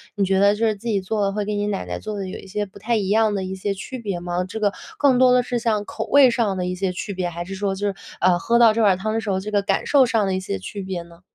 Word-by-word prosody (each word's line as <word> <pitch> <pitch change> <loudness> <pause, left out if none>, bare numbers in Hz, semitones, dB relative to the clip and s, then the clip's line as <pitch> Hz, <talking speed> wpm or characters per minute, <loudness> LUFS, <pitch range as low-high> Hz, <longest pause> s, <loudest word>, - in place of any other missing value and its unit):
你 200 - +1
觉 190 0 +2
得 200 +1 +5
就 225 +2 0
是 215 - +1
自 220 +4 -9
己 205 -3 +1
做 205 +2 -2
的 195 - +1
会 210 0 -2
跟 210 0 -2
你 205 0 -1
奶 200 - -2
奶 90 0 -5
做 210 -1 -5
的 195 -1 -4
有 185 - -6
一 - - -12
些 205 +2 -2
不 195 - -15
太 230 +3 0
一 200 -3 -1
样 215 +1 +3
的 195 -2 -2
一 190 +1 -5
些 200 +1 -2
区 205 +7 -7
别 200 -6 -3
吗？ 175 +1 -2
这 205 +4 -6
个 205 -2 +1 0.2
更 275 -3 +4
多 255 0 +5
的 250 - +5
是 245 - -2
像 215 -3 0
口 - - -5
味 280 -2 +6
上 225 -5 0
的 180 - -1
一 180 - -2
些 190 0 -1
区 180 +3 -5
别？ 180 -2 -2
还 175 0 -6
是 195 +2 -6
说 195 0 -1
就 205 +1 -2
是， 195 - -2 0.2
呃， 180 0 +4
喝 235 +6 +2
到 230 -2 +7
这 225 0 +1
碗 195 -3 +4
汤 215 +3 -2
的 225 - 0
时 215 - -5
候， 190 -1 +1
这 210 +3 -6
个 205 -1 +2
感 195 0 -1
受 275 -3 +5
上 225 -3 +1
的 190 - 0
一 - - -1
些 185 - -3
区 200 - -7
别 190 -2 -4
呢？ 170 0 -18
200 Hz, 365 characters per minute, -22 LUFS, 190-220 Hz, 0.2 s, 到